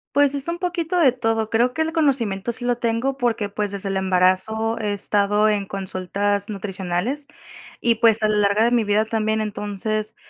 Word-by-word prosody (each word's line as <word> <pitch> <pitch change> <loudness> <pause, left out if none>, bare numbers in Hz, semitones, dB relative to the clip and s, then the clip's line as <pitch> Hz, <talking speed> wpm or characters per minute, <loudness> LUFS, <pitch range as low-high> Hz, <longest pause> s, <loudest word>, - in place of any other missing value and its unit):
Pues 285 -1 +4
es 280 +2 -4
un 340 +1 -3
poquito 350 -1 -1
de 285 -6 +5
todo. 225 -3 -1
Creo 240 +3 +2
que 320 - -2
el 320 - 0
conocimiento 240 - 0
sí 245 +1 -6
lo 245 -1 +1
tengo 240 +3 -1
porque, 230 -5 -1
pues, 205 0 -3
desde 200 0 -3
el 195 - -1
embarazo 190 +4 +1
he 210 -2 -1
estado 205 +1 +2
en 205 -2 0
consultas 195 +1 -2
nutricionales 195 +7 -3 0.6
y, 235 -1 +3
pues, 225 -1 +3
a 215 - +2
la 210 - +1
larga 205 +1 +3
de - - +3
mi 240 -2 +3
vida 210 +1 +2
también, 220 0 0
entonces, 210 +1 -2
215 Hz, 190 wpm, -22 LUFS, 200-245 Hz, 0.6 s, de